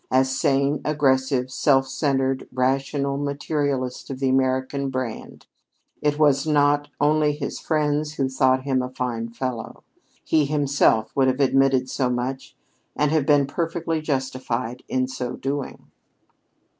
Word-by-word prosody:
A 130 +1 +4
sane, 140 +1 +1
aggressive, 130 -3 +1
self 135 0 +2
centered, 135 -1 -1
rational 135 +2 0
materialist 140 -2 -2
of 135 - -4
the 135 -1 +1
American 130 +1 0
brand, 130 -4 -5 0.6
it 150 -1 +1
was 145 -1 +3
not 145 -1 +3
only 150 0 +3
his 145 -1 -5
friends 150 -1 0
who 135 -2 0
thought 130 0 +2
him 130 -2 +1
a 125 - -4
fine 120 -3 -3
fellow. 120 -1 -5 0.4
He 155 -2 +2
himself 140 -6 +1
would 135 -1 +3
have 130 +1 0
admitted 135 -1 +3
so 130 -1 -1
much 125 +2 -4 0.4
and 150 0 +1
have 155 -3 +1
been 145 -2 +5
perfectly 165 +2 -2
justified 130 -4 -3
in 130 0 0
so 130 -1 -4
doing. 140 +1 -5
135 Hz, 135 wpm, -23 LUFS, 130-145 Hz, 0.6 s, been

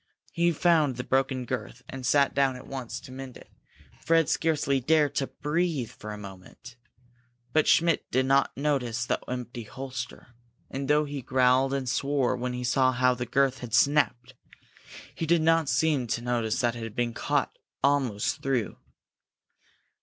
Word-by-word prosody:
He 170 0 +2
found 160 -5 +2
the 125 - -4
broken 130 -1 0
girth, 125 0 -5
and 135 -1 -8
sat 140 +2 +3
down 135 -2 +2
at 125 - -10
once 130 -3 -6
to 130 - -12
mend 130 -1 -8
it. - - -17 0.5
Fred 165 -1 +3
scarcely 145 -4 +1
dared 150 +1 +2
to 135 - 0
breathe 150 -5 -2
for 105 - -9
a 105 - -6
moment. 100 +5 -12 0.8
But 155 -1 +3
Schmidt 165 -1 +3
did 130 +1 +1
not 135 0 +2
notice 130 -5 -1
the - - 0
empty 125 -1 -5
holster, 130 +2 -7 0.4
and 135 0 -4
though 150 +1 +3
he 145 -1 -5
growled 130 +1 +3
and 135 -2 -3
swore 135 0 0
when 125 0 -3
he 125 0 -4
saw 130 +1 +3
how 125 0 +3
the 125 -1 -5
girth 135 -2 +1
had 120 -2 -3
snapped, 130 -2 +2 0.8
he 165 - -4
did 170 0 +3
not 165 -2 +3
seem 135 -1 +1
to 120 - -2
notice 120 -1 -1
that 120 -1 +1
it 120 - -7
had 115 -1 -7
been 120 -1 -1
cut - - -1 0.3
almost 140 -2 +1
through. 135 -6 -1
130 Hz, 170 wpm, -27 LUFS, 125-145 Hz, 0.8 s, sat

